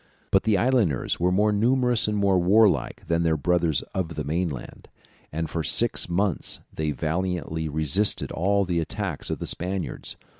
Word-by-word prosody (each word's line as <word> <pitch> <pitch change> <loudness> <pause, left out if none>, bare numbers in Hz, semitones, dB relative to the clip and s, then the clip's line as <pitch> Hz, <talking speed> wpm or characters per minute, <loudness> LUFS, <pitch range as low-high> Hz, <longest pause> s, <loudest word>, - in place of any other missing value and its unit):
But 95 - +3
the 110 -3 +3
islanders 110 - +1
were 90 +1 +2
more 105 +3 +3
numerous 120 +2 +2
and 105 0 -1
more 100 -2 +3
warlike 100 +3 +3
than 85 0 0
their 80 -2 +2
brothers 85 -1 +1
of 85 -3 -3
the 75 - -3
mainland, 80 -3 -4 0.4
and 80 +1 -2
for 80 +1 -3
six 115 +2 +1
months 95 +1 0
they 80 -1 -2
valiantly 80 0 -2
resisted 80 +7 +1
all 100 +3 +1
the 90 -2 0
attacks 80 - -4
of - - -2
the - - -5
Spaniards. 90 +1 -4
90 Hz, 160 wpm, -25 LUFS, 80-100 Hz, 0.4 s, But